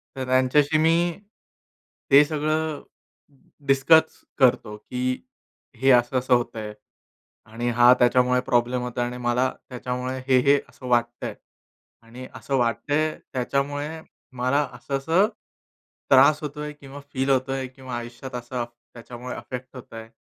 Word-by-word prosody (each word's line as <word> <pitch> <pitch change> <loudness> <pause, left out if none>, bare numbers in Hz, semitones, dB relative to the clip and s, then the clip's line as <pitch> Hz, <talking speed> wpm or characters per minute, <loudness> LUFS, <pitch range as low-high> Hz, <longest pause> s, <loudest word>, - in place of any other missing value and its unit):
तर 130 -1 -4
त्यांच्याशी 130 +4 +3
मी 160 +1 +4 1.2
ते 140 +2 +9
सगळं 155 0 -2 0.9
डिस्कस 160 +4 +4 0.2
करतो 120 -5 +3
की 125 +4 -7 0.8
हे 135 +3 +4
असं-असं 125 +1 +3
होतंय 115 -3 -1 0.8
आणि 120 +2 -2
हा 120 +1 +6
त्याच्यामुळे 125 +1 +3
प्रॉब्लेम 120 +1 +1
होतोय 125 0 -2
आणि 125 0 -5
मला 125 +2 +1 0.2
त्याच्यामुळे 125 +1 -4
हे-हे 135 +2 +4
असं 130 - -11
वाटतंय 120 -1 0 0.7
आणि 120 +3 -10
असं 140 - -3
वाटतंय, 145 +6 0 0.2
त्याच्यामुळे 145 +5 -2 0.4
मला 130 +4 +2
असं-असं 140 +10 +1 0.8
त्रास 140 +3 +6
होतोय 150 0 -5
किंवा 140 -1 -12
फील 135 +1 -1
होतोय 135 0 0
किंवा 130 -1 -9
आयुष्यात 120 +2 -8
असं 120 0 -4 0.3
त्याच्यामुळे 120 +1 -8
अफेक्ट 125 +1 -8
होतंय. 115 -3 -10
130 Hz, 115 wpm, -24 LUFS, 120-140 Hz, 1.2 s, ते